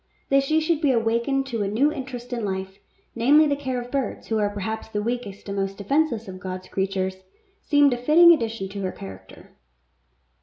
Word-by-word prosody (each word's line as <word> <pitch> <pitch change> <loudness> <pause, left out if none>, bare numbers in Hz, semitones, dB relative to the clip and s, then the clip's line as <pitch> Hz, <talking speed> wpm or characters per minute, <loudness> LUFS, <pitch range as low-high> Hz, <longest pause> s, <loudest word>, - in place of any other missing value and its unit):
That 275 0 +5
she 310 +3 +2
should 320 0 0
be 295 - +3
awakened 235 +3 +1
to 235 -5 -3
a 200 - 0
new 250 +9 +2
interest 255 -4 -6
in 235 -2 -3
life, 190 -1 -4 0.3
namely 290 +6 +5
the 290 -1 +1
care 260 -3 -3
of 245 0 -8
birds 275 -2 -3
who 220 -1 +1
are 205 -1 +1
perhaps 205 +2 -4
the 210 -1 -3
weakest 215 -3 -4
and 200 - -4
most 195 0 -2
defenceless 235 +1 0
of 185 -1 -8
God's 185 0 -7
creatures, 190 -1 -2 0.4
seemed 290 -2 +4
a - - -2
fitting 325 +7 +7
addition 225 -8 -2
to 200 0 -6
her 185 -1 -2
character. 95 - -12
230 Hz, 195 wpm, -24 LUFS, 195-275 Hz, 0.4 s, fitting